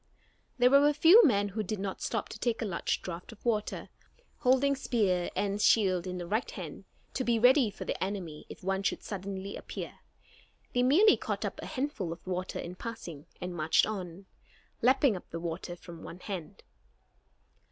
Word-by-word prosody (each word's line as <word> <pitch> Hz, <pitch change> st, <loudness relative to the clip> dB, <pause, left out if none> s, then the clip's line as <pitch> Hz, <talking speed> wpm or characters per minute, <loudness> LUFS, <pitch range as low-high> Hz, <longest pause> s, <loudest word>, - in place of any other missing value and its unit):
There 250 Hz, 0 st, +5 dB
were 280 Hz, +1 st, +7 dB
a 295 Hz, -, 0 dB
few 345 Hz, +10 st, +8 dB
men 205 Hz, -, +3 dB
who 215 Hz, +3 st, -3 dB
did 215 Hz, +1 st, -3 dB
not 195 Hz, 0 st, -4 dB
stop -, -, -2 dB
to 215 Hz, -, -8 dB
take 230 Hz, -1 st, 0 dB
a -, -, -1 dB
large 185 Hz, -5 st, -1 dB
draft 175 Hz, +2 st, -6 dB
of 225 Hz, -, -16 dB
water. 215 Hz, -3 st, -1 dB, 0.5 s
Holding 265 Hz, +2 st, +3 dB
spear 200 Hz, -10 st, +1 dB
and 200 Hz, 0 st, -1 dB
shield 190 Hz, -6 st, +3 dB
in 180 Hz, 0 st, -4 dB
the 175 Hz, -, -4 dB
right 215 Hz, +7 st, -1 dB
hand, -, -, -8 dB, 0.3 s
to 260 Hz, -, -1 dB
be 235 Hz, -2 st, +2 dB
ready 245 Hz, +1 st, +5 dB
for 205 Hz, -, -8 dB
the -, -, -2 dB
enemy 185 Hz, -6 st, -5 dB
if -, -, -11 dB
one 190 Hz, +1 st, 0 dB
should 200 Hz, -, -1 dB
suddenly 195 Hz, 0 st, -5 dB
appear, -, -, -7 dB, 0.7 s
they 245 Hz, -, +2 dB
merely 325 Hz, -, +6 dB
caught -, -, -3 dB
up -, -, -4 dB
a -, -, -6 dB
handful 260 Hz, -, -3 dB
of 170 Hz, -, -8 dB
the 185 Hz, -, -6 dB
water 185 Hz, +1 st, -3 dB
in 175 Hz, -, -5 dB
passing 180 Hz, -8 st, -8 dB
and 180 Hz, 0 st, -4 dB
marched 160 Hz, -1 st, +3 dB
on, 190 Hz, -3 st, -6 dB, 0.6 s
lapping 260 Hz, -1 st, +4 dB
up 180 Hz, -, -9 dB
the 165 Hz, -, -5 dB
water 170 Hz, +1 st, -4 dB
from 170 Hz, -1 st, -11 dB
one 180 Hz, -, -9 dB
hand. 185 Hz, -6 st, -6 dB
200 Hz, 190 wpm, -30 LUFS, 180-245 Hz, 0.7 s, few